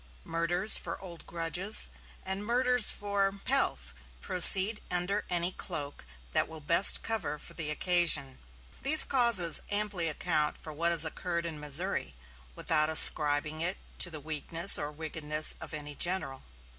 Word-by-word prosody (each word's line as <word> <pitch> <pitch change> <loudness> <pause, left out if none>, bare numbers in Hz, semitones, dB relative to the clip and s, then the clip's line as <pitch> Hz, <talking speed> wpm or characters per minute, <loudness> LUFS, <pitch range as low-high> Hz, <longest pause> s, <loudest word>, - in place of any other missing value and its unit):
Murders 175 +5 +1
for - - -9
old 175 -3 -13
grudges, 175 +5 0 0.3
and 190 +2 -6
murders 245 +1 +1
for 200 -1 -3
pelf, 275 +1 -2 0.3
proceed 190 +3 +5
under 180 +4 -4
any 175 0 -2
cloak 145 - -7 0.3
that - - -1
will 160 0 -12
best 170 +6 +1
cover 215 -9 -5
for - - -14
the 160 -3 -4
occasion. 165 -5 -1 0.4
These 310 +3 +3
causes 235 - +3
amply 205 -4 -2
account 150 -1 -3
for 155 - -12
what 170 +3 -2
has 165 -2 +6
occurred 170 +1 -6
in 160 -3 -8
Missouri, 150 - -1 0.4
without 155 -1 -1
ascribing 155 0 +6
it 180 +3 -2 0.2
to 180 - -1
the 160 -2 -10
weakness 160 +4 0
or 145 0 -6
wickedness 155 0 -1
of - - -9
any 150 -2 -9
general. 175 -5 -2
170 Hz, 145 wpm, -27 LUFS, 155-195 Hz, 0.4 s, has